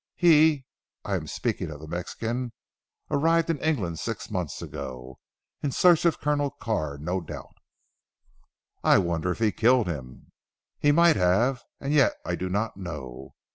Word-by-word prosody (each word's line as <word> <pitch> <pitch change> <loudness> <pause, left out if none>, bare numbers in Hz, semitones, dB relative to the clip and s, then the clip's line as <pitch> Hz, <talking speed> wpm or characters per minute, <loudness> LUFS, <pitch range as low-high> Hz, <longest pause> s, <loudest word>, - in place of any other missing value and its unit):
He 155 -5 +5 0.4
I - - -2
am - - -2
speaking - - -2
of 75 -2 -8
the 80 - -9
Mexican 115 +9 -4 0.6
arrived 165 +3 +3
in 155 - -3
England 105 - -1
six 115 -3 -5
months 90 -7 -3
ago 65 0 -7 0.4
in 145 - -1
search 175 +3 +4
of 170 - +2
Colonel 145 -1 +1
Carr 75 - -3
no 90 +6 -2
doubt." 80 - -9 1.3
"I - - +6
wonder 85 -2 0
if 90 - -1
he 110 -2 +2
killed 120 +1 +3
him?" 65 -8 -7 0.5
"He 145 - +4
might 170 -1 +5
have, 115 +8 +2 0.2
and 140 +1 -2
yet 300 - +5
I - - -2
do 95 - -3
not 105 +4 -1
know. 65 -8 -8
110 Hz, 155 wpm, -26 LUFS, -, 1.3 s, I